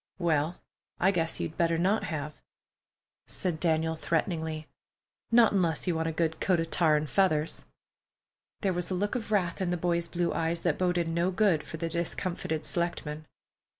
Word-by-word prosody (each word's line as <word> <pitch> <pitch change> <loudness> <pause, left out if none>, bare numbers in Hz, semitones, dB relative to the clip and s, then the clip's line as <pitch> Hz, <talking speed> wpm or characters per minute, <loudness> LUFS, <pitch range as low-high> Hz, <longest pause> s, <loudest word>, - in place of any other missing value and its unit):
"Well, 165 -2 +1 0.4
I 190 - +4
guess 165 -3 0
you - - -1
better 165 +1 +1
not 195 +6 +2
have," 150 -2 -4 0.9
said 175 -4 -2
Daniel 160 -1 +1
threateningly—"not 160 +7 -1
unless 170 -6 +1
you 180 - +1
want 160 0 -1
a - - 0
good 160 0 -1
coat 185 -3 +2
of 165 0 -2
tar 160 -3 +4
and 150 0 -2
feathers." 160 -3 +1 1.0
There 195 -3 +1
was 175 0 -2
a 185 - -1
look 205 +3 -1
of 230 -4 -3
wrath 185 -4 +1
in 185 - 0
the 175 - 0
boy's 170 0 0
blue 175 +1 -1
eyes 165 +1 -1
that 170 -4 0
boded 180 -2 +1
no 170 +2 +1
good 190 -4 +3
for 160 - -8
the 165 +1 -2
discomfited 165 -1 -2
selectman. 155 -3 -2
170 Hz, 170 wpm, -29 LUFS, 160-180 Hz, 1.0 s, I